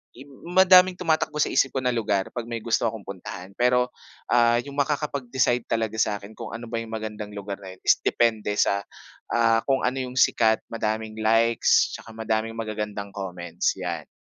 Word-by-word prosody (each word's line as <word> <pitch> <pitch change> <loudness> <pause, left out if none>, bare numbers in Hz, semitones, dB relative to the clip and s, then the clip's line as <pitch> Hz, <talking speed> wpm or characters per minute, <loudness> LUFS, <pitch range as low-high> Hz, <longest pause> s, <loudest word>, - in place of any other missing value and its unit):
im 140 +3 -13 0.2
madaming 185 0 +7
tumatakbo 155 -3 0
sa - - -1
isip 135 - +2
ko 130 - +2
na 125 - +2
lugar 105 -5 -1
pag 120 -1 -4
may 115 -2 -5
gusto 115 0 +1
akong 110 -3 -9
puntahan, 95 0 -8
pero, 125 +1 +3 0.4
ah, 120 0 +4
yung 140 +2 -7
makakapag 140 -3 -2
decide 125 -2 +2
talaga 110 -1 -2
sakin 105 -1 -2
kung 115 - -7
ano 115 +1 -7
ba 115 - -5
yung 115 - -11
magandang 110 -1 -5
lugar 100 -1 -5
na 95 - -8
yun - - -28
is - - +6
depende 110 -3 +1
sa 100 0 +2 0.8
kung, 135 -1 +1
ah, - - +3
ano 135 - -5
yung 125 - -11
sikat, 110 -2 +4
madaming 110 -1 -2
likes, 115 +1 +3
tsaka - - -11
madaming 110 0 -2
magagandang 105 -2 -4
comments 90 -3 -2
'yan. 85 -4 -4
115 Hz, 180 wpm, -25 LUFS, 105-125 Hz, 0.8 s, madaming